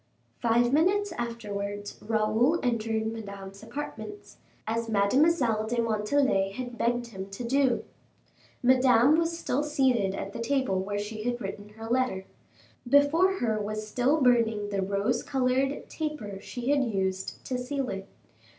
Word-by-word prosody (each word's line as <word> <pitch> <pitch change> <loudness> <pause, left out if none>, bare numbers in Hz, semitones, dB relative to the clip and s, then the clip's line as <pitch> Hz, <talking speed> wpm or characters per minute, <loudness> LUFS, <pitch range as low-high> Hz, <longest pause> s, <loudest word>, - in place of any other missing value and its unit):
Five 240 +1 +3
minutes 390 +6 +3
afterwards 205 -5 -5
Raoul 220 +8 +2
entered 225 -2 0
Madame's 200 -3 -8
apartments, 295 - -7 0.3
as 230 +1 -2
Mademoiselle 225 +1 +3
de 240 +1 -1
Montalais 215 -2 +1
had 245 +1 -5
begged 240 0 0
him 190 -3 -7
to 195 +5 -6
do. 260 0 +2 0.8
Madame 255 +2 +5
was 335 0 0
still 285 -4 -1
seated 260 -10 +1
at 195 +1 -5
the - - -6
table 230 -5 0
where 205 +2 -3
she 210 +1 -4
had 240 +2 -1
written 205 0 -6
her 225 - -7
letter. 240 -6 0 0.6
Before 290 +7 +5
her 225 - -1
was 215 +1 -4
still 255 +7 +2
burning 230 -5 +3
the 200 -1 -1
rose 200 +5 0
colored 265 +1 0
taper 275 -11 -5
she 245 +4 -3
had 285 -2 +3
used 190 -5 -2
to 255 -1 -2
seal 265 +1 -2
it. 195 0 -5
235 Hz, 140 wpm, -28 LUFS, 205-265 Hz, 0.8 s, Madame